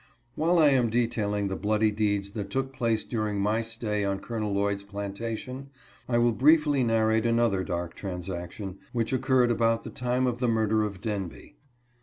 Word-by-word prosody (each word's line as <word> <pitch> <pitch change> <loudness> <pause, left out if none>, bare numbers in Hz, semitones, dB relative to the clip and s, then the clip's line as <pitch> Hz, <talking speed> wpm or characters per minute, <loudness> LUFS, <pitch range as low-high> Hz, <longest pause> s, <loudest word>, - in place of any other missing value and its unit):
While 170 +3 +2
I 155 -3 +6
am 125 -4 +3
detailing 110 -3 0
the 95 - -3
bloody 105 +2 +1
deeds 100 -2 0
that 100 -2 -5
took 135 +4 -2
place 115 -4 0
during 110 -3 -2
my 105 +3 +1
stay 110 -2 -2
on 100 -1 0
Col. 115 +3 -5
Lloyd's 100 0 0
plantation, 110 +6 -5 0.4
I 120 - +2
will 120 0 +4
briefly 145 +1 +4
narrate 110 0 +2
another 115 -5 +2
dark 85 -2 -3
transaction, 90 +1 -6
which 115 0 -1
occurred 130 -2 +3
about 115 0 +2
the - - -7
time 125 +1 0
of 120 -1 -1
the 125 - +1
murder 110 -1 +2
of 100 -3 -4
Denby. 100 -6 -5
110 Hz, 170 wpm, -27 LUFS, 100-120 Hz, 0.4 s, I